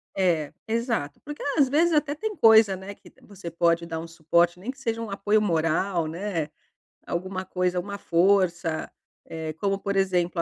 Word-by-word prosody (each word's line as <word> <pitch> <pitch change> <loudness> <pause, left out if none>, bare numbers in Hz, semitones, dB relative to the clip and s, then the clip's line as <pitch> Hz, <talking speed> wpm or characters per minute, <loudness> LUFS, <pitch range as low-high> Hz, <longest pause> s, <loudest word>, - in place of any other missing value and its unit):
É, 170 -6 +1
exato. 225 - -2
Porque 295 0 -7 0.2
às 280 -3 +5
vezes 330 +4 +3
até 295 -1 +2
tem 425 +7 -4
coisa, 220 - +6
né, 190 +2 -8
que - - -18
você 195 -4 -9
pode 170 0 +1
dar 160 -1 -4
um 165 - -7
suporte 170 +2 +1
nem 220 +7 -7
que 270 - -5
seja 230 -3 -2
um 225 - -5
apoio 210 +2 +1
moral, 170 -1 +1
né, 165 -2 -3 0.6
alguma 185 +2 -4
coisa, 180 0 -1
uma 200 +2 -5
força, 175 -3 +1 0.3
eh, 160 -1 -5
como 195 +4 -1
por 200 0 -3
exemplo 180 -3 +1
185 Hz, 175 wpm, -25 LUFS, 170-210 Hz, 0.6 s, coisa